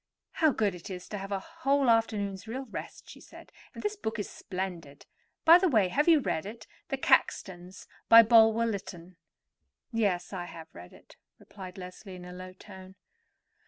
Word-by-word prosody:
"How 315 -3 +2
good 210 -6 0
it 180 +3 -10
is 180 -1 -7
to 210 - -5
have 195 +1 -7
a 200 - 0
whole 280 +1 0
afternoon's 215 -3 0
real 260 +4 -5
rest," 225 - -9
she - - -13
said; - - -15 0.2
"and - - -8
this 420 0 -2
book 225 - -4
is 205 - -3
splendid. 180 -7 -7 0.4
By 335 +2 +9
the 370 -1 +2
way, 215 -9 +3
have 295 - +1
you 330 -3 +6
read 175 - -2
it—'The 230 +4 -8
Caxtons,' 185 -7 0 0.2
by 230 0 +10
Bulwer 225 0 +5
Lytton?" 185 -5 -6 0.8
"Yes; 200 -5 -1
I 180 -2 -4
have 165 -2 -11
read 90 +1 -12
it," - - -19 0.2
replied 185 -2 -11
Leslie 185 +1 -10
in 180 -1 -10
a 180 - -9
low 185 0 -9
voice. 190 0 -13
200 Hz, 175 wpm, -29 LUFS, 180-230 Hz, 0.8 s, by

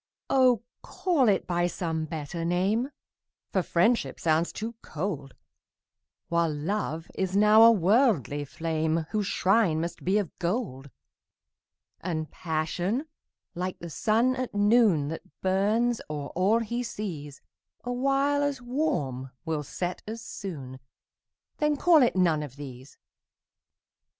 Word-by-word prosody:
Oh, 255 -4 +4 0.2
call 305 - +1
it 200 - +2
by 175 -1 +1
some 160 -3 -2
better 155 +1 -5
name, 195 +9 +1 0.6
For 190 - +2
Friendship 180 +8 +1
sounds 160 +1 +1
too 225 +2 -5
cold, 155 -5 -4 0.9
While 170 -1 +1
Love 160 +1 -3
is 190 0 -1
now 210 +1 +7
a 230 +1 +9
worldly 195 - +2
flame, 160 +1 -1
Whose 210 -3 0
shrine 190 -5 +2
must 170 +1 -4
be 190 +3 +2
of 200 -6 -2
gold: 170 - -2 1.1
And 160 -3 -3
Passion, 175 - -2 0.5
like 180 +1 -3
the 170 -1 -8
sun 225 - +2
at 255 -4 -4
noon, 205 -8 +4
That 165 +4 -9
burns 215 +6 +1
o'er 145 -2 -4
all 200 +6 +2
he 235 +2 -2
sees, 170 - -6 0.4
Awhile 275 +3 +1
as 285 -2 0
warm 195 - -2 0.2
will 160 -2 -1
set 175 +5 -4
as 225 +2 -5
soon 135 -10 -7 0.8
Then 300 -1 +1
call 330 0 +6
it 245 - +3
none 170 -5 +3
of 145 -4 -7
these. 130 -2 -10
185 Hz, 125 wpm, -27 LUFS, 160-230 Hz, 1.1 s, a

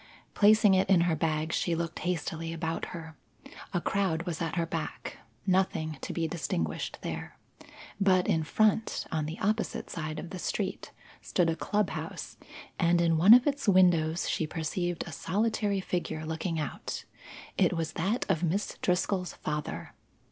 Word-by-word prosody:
Placing 210 0 +6
it 190 0 +3
in 185 -3 +6
her 170 -1 +2
bag, 155 0 -1
she 170 - +1
looked 165 0 -3
hastily 165 -2 -2
about 165 0 -2
her. 160 -2 -8 0.6
A 180 - +1
crowd 175 -3 0
was 170 -3 -4
at 165 -1 -2
her 170 -1 +1
back; 165 - -5 0.3
nothing 165 -6 +1
to - - -4
be 165 -1 -1
distinguished 85 - -2
there. - - -5 0.6
But 185 -2 +4
in 160 - +2
front, 215 +6 +1
on 155 -1 -1
the 160 +3 -5
opposite 215 +3 -1
side 155 -2 -4
of 165 - -6
the 185 - -5
street, - - -3 0.3
stood 170 -3 +1
a - - -2
club 205 +4 0
house, - - -6 0.4
and 170 -1 +4
in 165 -1 +3
one 195 +8 +9
of 250 - +4
its 285 -4 -1
windows 175 -4 +4
she 160 - 0
perceived 170 +2 -2
a 170 - -8
solitary 205 +6 0
figure 175 -4 -3
looking 160 +1 -2
out. 150 - -4 0.5
It - - +3
was 160 -1 -2
that 200 +9 0
of 160 - +1
Miss 180 +4 -1
Driscoll's 180 0 0
father. 150 0 -4
170 Hz, 160 wpm, -29 LUFS, 160-190 Hz, 0.6 s, one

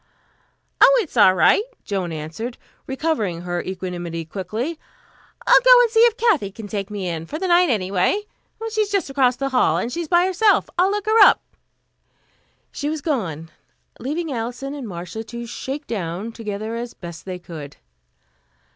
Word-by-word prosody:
"Oh, - - +7
it's 325 - -13
all 195 -5 +6
right," 300 - +5 0.2
Joan 190 -5 -3
answered, 165 +10 -6 0.3
recovering 260 - -1
her 175 0 -3
equanimity 175 -3 -5
quickly. 215 - -4 0.7
"I'll - - +7
go - - +8
and 470 - 0
see 450 - +3
if 465 0 +5
Kathy 425 - +2
can 220 +2 -9
take 200 -1 -4
me 200 -3 -4
in, 165 -1 -4
for 305 - -5
the 375 - -2
night, 350 -1 +4
anyway. 195 - +1 0.5
She's 430 -1 0
just 395 -8 -1
across 260 -3 +3
the 275 +2 -2
hall, 250 -11 +2
and 230 +7 -2
she's 335 +4 -3
by 350 +2 +4
herself. 380 +3 +2
I'll 360 +2 +3
look 410 0 -2
her 435 +1 +3
up." 410 - +8 1.3
She 290 - -3
was 310 -1 -3
gone, 170 - -3 0.5
leaving 310 +5 -3
Alison 245 +4 -4
and 280 -5 -6
Marcia 180 +4 -6
to 235 +1 -7
shake 265 +5 -6
down 190 +1 -4
together 215 -1 -5
as 235 0 -6
best 170 -2 -9
they 185 -1 -5
could. 160 -5 -10
230 Hz, 165 wpm, -21 LUFS, -, 1.3 s, go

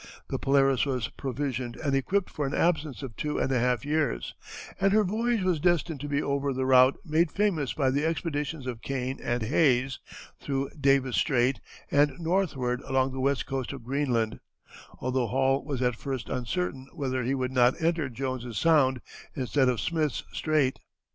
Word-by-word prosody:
The - - -2
Polaris 135 -1 +3
was 130 -5 -1
provisioned 130 -3 -3
and 140 -3 -1
equipped 185 +8 0
for 145 -3 -2
an 135 - -3
absence 155 -5 0
of 125 -5 -7
two 150 0 -2
and 135 - 0
a 130 - +2
half 125 +2 +1
years, 150 - -1 0.5
and 195 0 +3
her 215 0 +5
voyage 220 +2 0
was 180 -4 +1
destined 165 -2 +1
to 145 - -5
be 145 +1 0
over 140 0 0
the 130 0 -1
route 130 0 +6
made 160 0 +2
famous 185 -10 0
by 135 -3 +1
the 140 +3 0
expeditions 150 -3 -2
of 120 -3 -5
Kane 130 0 -3
and 120 -1 -1
Hayes, 130 0 +2 0.4
through 135 -1 -2
Davis 135 -3 +2
Strait 130 -2 +2 0.3
and 145 0 +3
northward 160 -8 0
along 135 -1 0
the 130 - -5
west 140 +1 +1
coast 135 -1 -3
of 135 -3 -9
Greenland, 120 -4 0 0.6
although 130 -1 -1
Hall 135 +3 +1
was 135 -4 -3
at 125 -1 +1
first 130 0 -5
uncertain 130 +1 -3
whether 130 -5 -1
he 130 +3 0
would 130 -1 -2
not 125 +1 +3
enter 165 -4 0
Jones's 125 -2 -4
Sound, 135 -6 +3 0.3
instead 130 -1 +2
of 125 - 0
Smith's 155 -5 -1
Strait. 150 -4 +1
135 Hz, 175 wpm, -28 LUFS, 130-150 Hz, 0.6 s, route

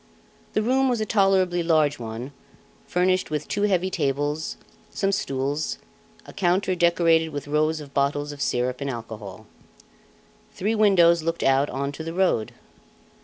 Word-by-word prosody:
The 215 - +1
room 260 +3 +2
was 245 -2 0
a 215 - -1
tolerably 190 -4 +2
large 155 -4 +2
one, 115 +3 -6 0.6
furnished 185 +1 +1
with 150 -1 -3
two 205 - -2
heavy 185 -1 +1
tables, 145 0 -1 0.3
some 195 0 -1
stools, 145 -5 -2 0.5
a - - -12
counter 185 0 +1
decorated 170 -2 +3
with 145 -1 -6
rows 155 +2 +1
of 140 -2 -11
bottles 145 +1 0
of 145 -1 -9
syrup 125 0 -1
and 140 - -2
alcohol. 110 -5 -8 1.1
Three 210 +4 -1
windows 180 -6 +4
looked 165 +1 -2
out 135 +2 +3
on 140 +2 -3
to 150 +3 -7
the 165 +1 -6
road. 180 - +1
160 Hz, 150 wpm, -24 LUFS, 140-185 Hz, 1.1 s, windows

